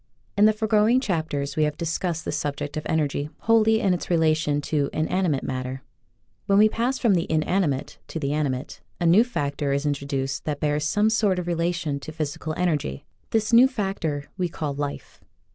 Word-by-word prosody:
In 205 - +5
the 215 - +7
foregoing 220 +2 +3
chapters 160 - -2
we 155 - +1
have 150 0 -2
discussed 165 0 -2
the - - -2
subject 145 0 -3
of 155 - -4
energy 145 -2 0
wholly 220 -1 +4
in 195 -4 +2
its 175 - -4
relation 155 -3 +2
to 145 -1 0
inanimate 155 -2 0
matter. 130 0 -4 0.6
When 195 - +4
we 215 +1 +6
pass 245 +4 -1
from 230 -5 +3
the 175 -2 0
inanimate 155 -3 0
to 165 - -5
the 140 -1 -1
animate 145 -3 -2 0.2
a 175 - 0
new 180 +7 +6
factor 145 - -2
is 140 +2 -1
in 145 - +2
troduced 140 0 -3
that 150 -2 -2
bears 150 0 0
some 210 +6 +2
sort 210 -4 +2
of 180 - -2
relation 170 -4 -1
to 155 - -8
physical 155 0 -4
energy. 150 - -1 0.2
This 220 0 0
new 245 +3 +8
factor 195 - -2 0.2
we 180 -1 0
call 150 -3 -3
Life. 145 0 -6
160 Hz, 185 wpm, -24 LUFS, 145-195 Hz, 0.6 s, new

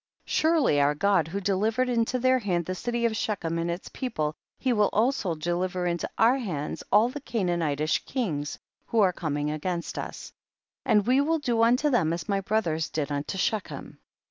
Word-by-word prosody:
Surely 310 - +3
our 145 +1 +3
Gocl 190 -1 +2
who 190 +5 -3
delivered 210 +6 +1
into 240 0 +1
their 255 +1 +3
hand 180 -6 -1
the 185 - -3
city 235 +5 -2
of 225 -1 +1
Shechem 170 -7 -2
and 170 +1 -1
its 170 +2 -4
people, 155 - -2 0.2
he 255 -2 +1
will 210 -2 +3
also 215 -6 +1
deliver 175 +3 -2
into 170 -1 -1
our 250 +4 +4
hands 155 - -4
all 215 +4 +5
the 290 +3 -7
Canaanitish 170 - 0
kings 160 - -2 0.3
who 230 - +1
are 185 -3 +4
coming 150 -3 -2
against 170 +3 -3
us, - - -7 0.5
and 210 -2 +4
we 255 +3 +4
will 325 +3 +1
do 240 -6 0
unto 250 +6 +3
them 170 -10 +2
as 170 +2 -5
my 200 -2 0
bro 215 +3 +1
thers 160 -4 -2
did 150 -2 -3
unto 145 +6 -3
Shechem. 210 +1 -3
195 Hz, 185 wpm, -27 LUFS, 165-235 Hz, 0.5 s, all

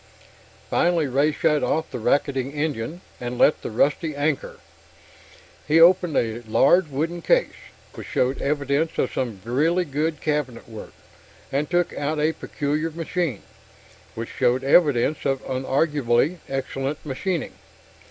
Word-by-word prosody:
Finally 170 -3 +2
Ray 140 +3 +2
shut 150 0 +1
off 160 0 -1
the 125 - -4
racketing 135 +2 0
engine 150 +1 -3 0.2
and 125 0 -5
let 150 - +5
out - - -28
the - - -5
rusty 145 +7 0
anchor. 145 0 -1 1.1
He 155 +2 +4
opened 175 -1 +5
a 115 0 -1
large 165 +10 +4
wooden 160 +5 -3
case, - - +2 0.4
which - - -9
showed 130 +2 0
evidence 145 +2 0
of - - 0
some 115 -6 -3
really 160 +9 +1
good 155 +2 -2
cabinet 150 -6 -2
work, 110 -2 -10 0.6
and 145 +2 -1
took 175 0 +1
out 150 +2 -2
a 155 +2 +2
peculiar 150 +2 -2
machine, 165 - -3 0.7
which 115 0 -5
showed 125 0 +1
evidence 145 -1 +3
of 135 -1 -1
unarguably 135 +3 +1
excellent 135 +2 -3
machining. 160 +5 -3
145 Hz, 135 wpm, -23 LUFS, 130-160 Hz, 1.1 s, let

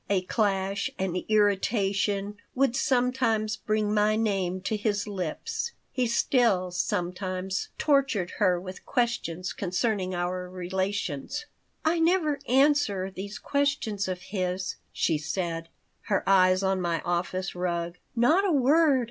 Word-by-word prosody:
A 195 -2 +2
clash, 195 -1 0
an 190 -2 -1
irritation, 205 -1 +1 0.2
would 260 -2 +2
sometimes 245 -5 +1
bring 215 0 0
my 210 0 +3
name 195 -4 0
to 215 +3 -1
his 205 -1 0
lips. 205 - -3 0.2
He 250 -2 0
still, 230 -6 +2
sometimes, 185 +2 -2
tortured 275 - +2
her 180 -1 +3
with 185 +1 -9
questions 230 -9 -1
concerning 185 0 -1
our 180 +1 -2
relations 185 - -3 0.4
"I 330 +2 +3
never 325 -4 +2
answer 260 -8 +3
these 200 +2 -6
questions 280 -9 0
of 185 -1 -3
his," 185 -1 -2
she 160 -3 +1
said, 165 +1 -3 0.4
her 200 - 0
eyes 185 -1 +5
on 190 -1 +1
my 170 -2 0
office 180 +1 -2
rug. 175 -1 -2 0.2
"Not 300 +12 +4
a 395 - +2
word. 290 0 +4
200 Hz, 125 wpm, -27 LUFS, 185-240 Hz, 0.4 s, eyes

